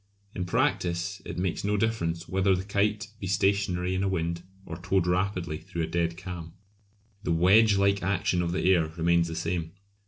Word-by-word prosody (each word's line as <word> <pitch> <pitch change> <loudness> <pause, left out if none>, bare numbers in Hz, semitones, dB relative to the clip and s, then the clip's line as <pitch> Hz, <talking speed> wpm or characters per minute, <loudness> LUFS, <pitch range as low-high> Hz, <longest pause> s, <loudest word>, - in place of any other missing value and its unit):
In 90 - -3
practice 90 +2 0
it 85 - -6
makes 90 -1 -2
no 105 +1 +1
difference 90 -6 -1
whether 95 0 +2
the 90 - -3
kite 105 0 0
be 95 - -4
stationary 95 -1 +1
in 95 - 0
a 100 - +1
wind 85 -2 -2 0.2
or 80 - -6
towed 90 0 0
rapidly 90 -3 -1
through 85 -4 -4
a - - +1
dead 85 +1 -1
calm; 90 -3 -7 0.7
the 90 - -2
wedge 100 +5 +5
like 100 0 +2
action 95 -1 0
of 85 -1 -1
the 90 - 0
air 85 -3 +2
remains 85 0 +3
the 80 - -5
same. 85 0 -3
90 Hz, 185 wpm, -27 LUFS, 85-100 Hz, 0.7 s, wedge